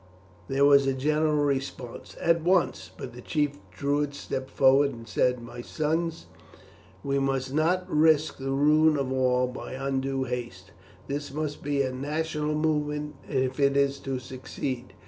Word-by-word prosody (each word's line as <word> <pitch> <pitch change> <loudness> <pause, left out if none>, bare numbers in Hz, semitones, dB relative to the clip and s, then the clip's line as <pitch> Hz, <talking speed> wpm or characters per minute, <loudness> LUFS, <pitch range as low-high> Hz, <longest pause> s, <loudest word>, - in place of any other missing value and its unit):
There 135 +1 +3
was 140 -1 +6
a 135 - +2
general 150 +3 +1
response 135 -3 -4
"At 170 0 +2
once!" 180 +1 +1
but 125 - -7
the 125 - -10
chief 145 +1 -1
Druid 145 0 -1
stepped 130 -2 -4
forward 135 +1 +4
and 115 -3 -10
said: 125 +3 +1
"My 120 +1 -8
sons, 160 +4 -2 0.8
we 140 0 0
must 135 -1 -1
not 175 +5 +2
risk 155 -3 +3
the 135 0 -3
ruin 150 +3 +4
of 135 -2 -1
all 125 -1 +2
by 125 0 -7
undue 135 0 -1
haste; 120 -7 -5 0.4
this 145 0 -4
must 150 0 -3
be 145 -1 0
a 130 - -2
national 150 +2 -2
movement 150 -1 -1 0.2
if 130 -1 0
it 140 0 +3
is 140 0 +2
to 135 -1 -3
succeed. 130 0 -5
140 Hz, 155 wpm, -27 LUFS, 130-150 Hz, 0.8 s, was